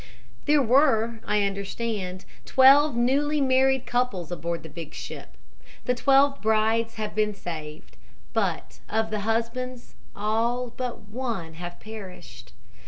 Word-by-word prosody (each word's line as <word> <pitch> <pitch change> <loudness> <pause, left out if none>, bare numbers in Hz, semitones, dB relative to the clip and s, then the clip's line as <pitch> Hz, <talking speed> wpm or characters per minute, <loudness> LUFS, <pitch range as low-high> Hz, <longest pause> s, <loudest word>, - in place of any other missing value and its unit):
"There 295 -1 +4
were, 235 -3 +3
I 210 -1 +2
understand, 200 -1 -3 0.2
twelve 275 +1 +6
newly 280 +5 +2
married 265 -1 +3
couples 240 -9 -1
aboard 170 0 -3
the - - -8
big 165 -3 -8
ship. - - -8 0.5
The 250 - +2
twelve 275 +2 +3
brides 220 +1 +2
have 215 -1 -4
been 210 -1 0
saved, 155 -5 -8 0.4
but - - -2
of 220 0 0
the 215 - -1
husbands 235 +4 -3 0.2
all 230 +4 0
but 250 -2 -4
one 225 -8 -4
have 175 +1 -8
perished. 190 - -10
225 Hz, 125 wpm, -26 LUFS, 195-255 Hz, 0.5 s, twelve